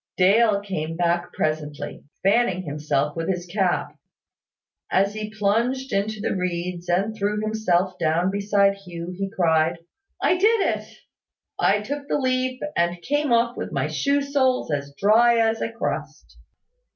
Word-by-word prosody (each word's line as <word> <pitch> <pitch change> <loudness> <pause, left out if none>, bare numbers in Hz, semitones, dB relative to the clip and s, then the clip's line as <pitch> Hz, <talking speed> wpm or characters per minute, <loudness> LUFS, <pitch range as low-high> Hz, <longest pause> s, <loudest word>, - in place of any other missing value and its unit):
Dale 200 +2 +4
came 165 -5 -4
back 175 0 0
presently, 155 -1 -3 0.2
fanning 195 -2 +2
himself 150 -1 -1
with 165 +1 -3
his 180 -2 -2
cap. 180 0 -1 0.9
As 195 +2 +2
he 215 0 -5
plunged 230 +6 0
into 210 +2 -1
the - - -1
reeds, 180 -1 -3
and 195 +5 +1
threw 210 0 -1
himself 190 -4 0
down 170 +3 +1
beside 200 0 +2
Hugh, 175 -2 -7
he 195 +1 -3
cried, 165 -5 +2 0.4
"I 360 - +2
did 430 +1 +3
it! - - -13 0.7
I 205 +1 +3
took 280 +6 -5
the - - +1
leap, 255 -1 -1
and 175 +1 +1
came 290 0 0
off 235 +1 +3
with - - -5
my - - 0
shoe 280 0 0
soles 260 - +1
as 140 -1 -2
dry 230 +4 +5
as 225 0 +2
a 230 - -2
crust. 230 - -5
200 Hz, 150 wpm, -23 LUFS, 175-230 Hz, 0.9 s, dry